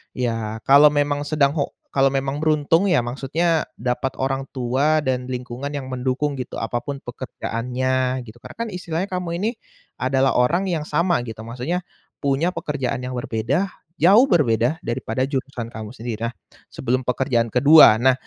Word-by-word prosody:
ya 115 -3 -2
kalau 140 +2 +7
memang 145 0 0
sedang 145 -2 +2
ho 140 - -2 0.2
kalau 135 0 +3
memang 135 +1 -1
beruntung, 155 +4 +2
ya 170 -9 +3
maksudnya 150 +7 0
dapat 125 +2 -2
orang 135 0 -1
tua 135 +5 +1
dan 125 -2 -1
lingkungan 125 +2 -5
yang 135 -2 -5
mendukung 130 +3 -1
gitu 125 - -5
apa 120 +2 -2
pun 140 +2 -7
pekerjaannya 125 +1 -2
gitu, 115 +1 -13
karena - - -12
kan 230 -1 -2
istilahnya 180 +1 -3
kamu 180 -2 -3
ini, 220 - +1 0.5
adalah 135 +1 +2
orang 175 +10 +2
yang 155 -3 -1
sama 170 0 +1
gitu 110 0 -7
maksudnya, 125 +10 -3 0.4
punya 140 +5 +1
pekerjaan 145 -6 -3
yang 125 - -4
berbeda- 120 - -1 0.3
jauh 200 - +6
berbeda- 125 - +2
daripada 120 +1 -1
jurusan 130 -4 -4
kamu 110 -1 -6
sendiri. 115 -1 -4
Nah, - - -12 0.4
sebelum 130 0 -1
pekerjaan 125 -2 +1
ke-2. 140 -2 +7
Nah, 130 +2 +4
135 Hz, 160 wpm, -22 LUFS, 125-150 Hz, 0.5 s, kalau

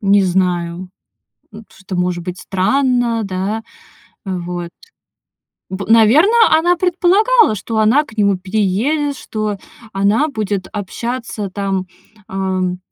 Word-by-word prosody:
не 200 0 +4
знаю, 180 -1 -1 0.7
м, 215 0 -11
что-то 190 -1 -8
может 180 -1 -1
быть 180 +1 -6
странно, 240 +3 +1
да. 195 +3 -3 0.6
Вот. 175 -2 -4 1.0
П 190 +1 -5
наверно, 235 - +5 0.3
она 350 +2 +2
предполагала, 370 - +3
что 220 +3 -3
она 235 +8 +4
к 225 - -15
нему 200 -2 +2
переедет, 220 +10 -1
что 215 -2 -4 0.3
она 205 +10 +1
будет 205 -6 -3
общаться, 220 +1 -4
там, 195 -1 -3 0.4
ам, 185 -1 -2
205 Hz, 110 wpm, -17 LUFS, 185-240 Hz, 1.0 s, наверно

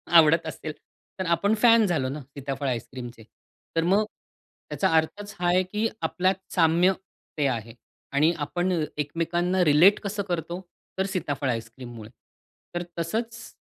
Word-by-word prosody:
आवडत 165 0 +7
असेल 155 0 -5 0.5
तर 190 - -1
आपण 200 +5 +1
फॅन 230 -2 +7
झालो 155 -9 0
ना 145 +3 -5
सीताफळ 140 0 -5
आईस्क्रीमचे? 120 -1 -5 0.5
तर 165 - +2
मग 195 +5 +3 0.6
त्याचा 190 - +1
अर्थच 205 +6 0
हा 175 - +1
आहे 180 +1 +4
की 210 +4 -1
आपल्यात 185 +1 +1 0.2
साम्य 170 +1 +4 0.5
ते 145 - +2
आहे 115 -3 -3 0.4
आणि 150 +4 +4
आपण 175 +5 -1 0.3
एकमेकांना 170 +5 0
रिलेट 165 +7 +6
कसं 200 0 -2
करतो? 170 0 -2 0.4
तर 190 - +1
सीताफळ 145 -8 -2
आईस्क्रीममुळे. 115 -1 -6 0.7
तर 175 - -1 0.2
तसंच 230 +7 -3
165 Hz, 135 wpm, -26 LUFS, 140-190 Hz, 0.7 s, आवडत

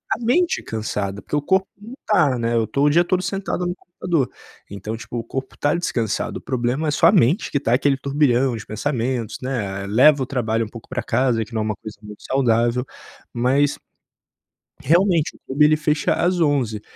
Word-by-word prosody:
A - - -10
mente 320 +10 +1
cansada, 105 -2 -4
porque - - -4
o 145 - +1
corpo 190 +5 +1
não 235 +5 -10
tá, 155 - +3
né. 115 0 -1
Eu 110 -2 +1
tô 140 +6 0
o 150 - +5
dia 170 +4 +4
todo 185 +1 0
sentado 190 -1 -3
no 175 +1 -2
computador. 170 -6 -2 0.4
Então, 100 +3 -5
tipo, 120 0 -7
o 115 - -3
corpo 130 +3 -6
tá 145 - +1
descansado. 115 - -2
O - - -10
problema 130 +4 -1
é - - +1
só - - +4
a - - +7
mente 150 - +2
que 140 - +1
tá 120 -3 0
aquele 135 +1 +2
turbilhão 135 -2 +1
de 110 -2 -8
pensamentos, 120 -1 -2
né. 105 -7 -3
Eh, 100 - -6
leva 135 +7 +5
o - - -3
trabalho 115 -4 -1
um - - -10
pouco 115 -1 -12
pra - - -2
casa, 120 -2 +1
que 115 - -17
não 110 - -1
é 110 - -1
uma 110 -2 -2
coisa 110 +2 -10
muito 105 0 -12
saudável. 120 -1 +1 0.5
Mas, 135 +4 +1 1.0
realmente 170 -1 +2
o - - -20
clube 145 +3 +3
ele 155 0 +5
fecha 150 -1 +1
às 180 0 +1
23h 130 -9 +1
130 Hz, 210 wpm, -21 LUFS, 115-155 Hz, 1.0 s, a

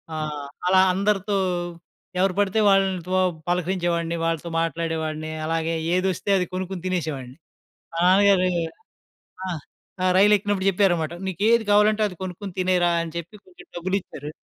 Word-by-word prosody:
ఆహ్, 150 -2 -4 0.2
అలా 190 0 +6
అందరితో 200 +1 0 0.8
ఎవరు 190 0 +2
పడితే 205 +2 +2
వాళ్ళతో 190 -2 +1 0.3
పలకరించేవాడిని, 175 -2 0
వాళ్ళతో 165 0 -2
మాట్లాడేవాడిని. 160 -1 -2
అలాగే 165 0 -1 0.2
ఏదొస్తే 185 +1 -1
అది 180 - -1
కొనుక్కొని 185 -1 -4
తినేసేవాడిని. 150 -7 -3 0.6
మా - - -4
నాన్నగారు 190 0 +5 1.0
ఆ! - - -2 0.5
ఆ! - - +3
రైలు 205 +2 +6
ఎక్కినప్పుడు 200 -1 -1
చెప్పారన్నమాట. 175 -4 +1
"నీకు 190 +1 -4
ఏది 235 -1 +4
కావాలంటే 210 +1 +4
అది 180 - -10
కొనుక్కొని 185 +1 -6
తినేయరా" 180 -1 +2
అని 165 -1 -6
చెప్పి 170 +5 -6
కొంచెం 365 -1 -16
డబ్బులిచ్చారు. 175 -5 -3
185 Hz, 130 wpm, -24 LUFS, 165-195 Hz, 1.0 s, అలా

